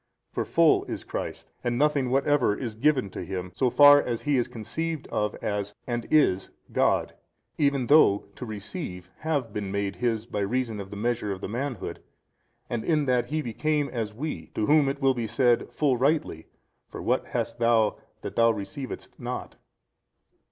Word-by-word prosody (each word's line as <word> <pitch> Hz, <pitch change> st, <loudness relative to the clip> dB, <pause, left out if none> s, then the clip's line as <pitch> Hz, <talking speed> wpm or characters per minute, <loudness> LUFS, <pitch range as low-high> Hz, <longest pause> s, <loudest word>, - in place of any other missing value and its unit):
For -, -, -1 dB
full -, -, +4 dB
is -, -, -5 dB
Christ -, -, -6 dB
and 120 Hz, -1 st, 0 dB
nothing 145 Hz, -2 st, +2 dB
whatever 135 Hz, -4 st, +2 dB
is 120 Hz, -5 st, -4 dB
given 130 Hz, -3 st, +1 dB
to -, -, -5 dB
Him 95 Hz, -1 st, -5 dB
so 125 Hz, +6 st, +2 dB
far 145 Hz, +2 st, +8 dB
as 120 Hz, -2 st, -3 dB
He 145 Hz, -1 st, +2 dB
is 120 Hz, -2 st, +2 dB
conceived 160 Hz, +8 st, -4 dB
of 105 Hz, 0 st, -1 dB
as, 100 Hz, -1 st, -2 dB
and 120 Hz, -2 st, -3 dB
is, 95 Hz, -12 st, +3 dB, 0.2 s
God, -, -, +2 dB, 0.5 s
even 140 Hz, -3 st, +2 dB
though 120 Hz, -8 st, +5 dB
to -, -, -8 dB
receive 100 Hz, -5 st, -6 dB
have 145 Hz, -8 st, -1 dB
been 100 Hz, -2 st, -3 dB
made 100 Hz, -1 st, -2 dB
His 115 Hz, -3 st, 0 dB
by 105 Hz, -, -4 dB
reason 115 Hz, +1 st, -1 dB
of 100 Hz, -1 st, -7 dB
the 100 Hz, -, -7 dB
measure 115 Hz, -1 st, -1 dB
of 95 Hz, -, -4 dB
the -, -, -5 dB
manhood 120 Hz, +2 st, -4 dB, 0.7 s
and 115 Hz, -2 st, -3 dB
in 155 Hz, -3 st, +2 dB
that 125 Hz, -2 st, +1 dB
He 155 Hz, +1 st, -2 dB
became 145 Hz, +5 st, 0 dB
as 115 Hz, -3 st, -3 dB
we, 110 Hz, -, -5 dB
to 105 Hz, -, +1 dB
whom 150 Hz, 0 st, +4 dB
it 140 Hz, 0 st, -4 dB
will 135 Hz, 0 st, +5 dB
be 120 Hz, -3 st, -3 dB
said 120 Hz, +1 st, +2 dB
full 140 Hz, -4 st, +1 dB
rightly, 135 Hz, -, 0 dB, 0.4 s
For -, -, -8 dB
what -, -, 0 dB
hast -, -, -3 dB
thou 115 Hz, -2 st, +3 dB, 0.2 s
that -, -, -6 dB
thou 115 Hz, 0 st, +5 dB
receivedst 115 Hz, +6 st, -6 dB
not? -, -, -5 dB
120 Hz, 180 wpm, -27 LUFS, 105-140 Hz, 0.7 s, far